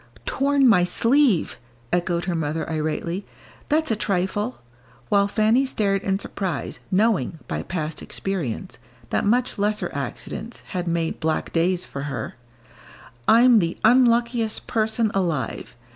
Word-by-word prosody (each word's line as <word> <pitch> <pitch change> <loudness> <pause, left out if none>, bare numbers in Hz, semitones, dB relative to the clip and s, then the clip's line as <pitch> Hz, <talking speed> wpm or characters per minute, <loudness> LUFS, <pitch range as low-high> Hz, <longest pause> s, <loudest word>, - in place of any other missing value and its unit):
"Torn 275 0 +2
my 190 -7 +5
sleeve!" 230 - +2 0.4
echoed 175 -1 0
her 180 - -1
mother, 160 -1 -2
irately, 160 +4 -2 0.5
"that's 310 -2 +2
a - - +2
trifle," 205 +3 -1 0.5
while 200 -1 +4
Fanny 220 +5 +3
stared 200 -7 0
in 195 -1 0
surprise, 185 -10 -4
knowing, 190 - +1
by - - -3
past 155 -3 -4
experience, 175 - -4 0.3
that - - +1
much 245 0 +1
lesser 210 +1 0
accidents 140 - -6
had 180 -3 -3
made 165 -1 -1
black 160 -1 -1
days 175 +2 +1
for 140 - -6
her; - - -4 0.9
"I'm 235 0 +7
the 170 -2 -1
unluckiest 235 -1 +3
person 220 0 +1
alive. 170 -12 -2
195 Hz, 130 wpm, -23 LUFS, 170-230 Hz, 0.9 s, I'm